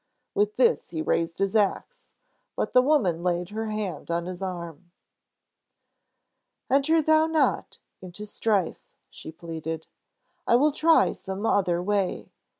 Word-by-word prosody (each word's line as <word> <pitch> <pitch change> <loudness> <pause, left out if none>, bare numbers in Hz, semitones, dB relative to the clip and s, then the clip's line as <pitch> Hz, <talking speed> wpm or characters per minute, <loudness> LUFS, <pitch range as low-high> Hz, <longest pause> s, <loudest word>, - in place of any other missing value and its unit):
With 210 +1 +1
this 255 - +2
he 160 -2 -3
raised 165 +1 -1
his 195 +2 -1
ax, 220 - -1 0.5
but - - -2
the 250 - +7
woman 250 - +2
laid 175 +1 -1
her 220 +1 -3
hand 210 -8 -4
on 170 0 -1
his 180 +1 -7
arm. 175 -2 -6 1.8
"Enter 310 +4 +3
thou 315 +1 +4
not 320 -1 0 0.2
into 185 +3 -8
strife!" 205 -3 -1 0.3
she - - -9
pleaded. 160 -1 -6 0.6
"I - - +5
will 295 +5 +4
try 320 +3 +4
some 190 +3 -6
other 180 -5 +1
way. 200 -1 -1
195 Hz, 135 wpm, -26 LUFS, 170-240 Hz, 1.8 s, the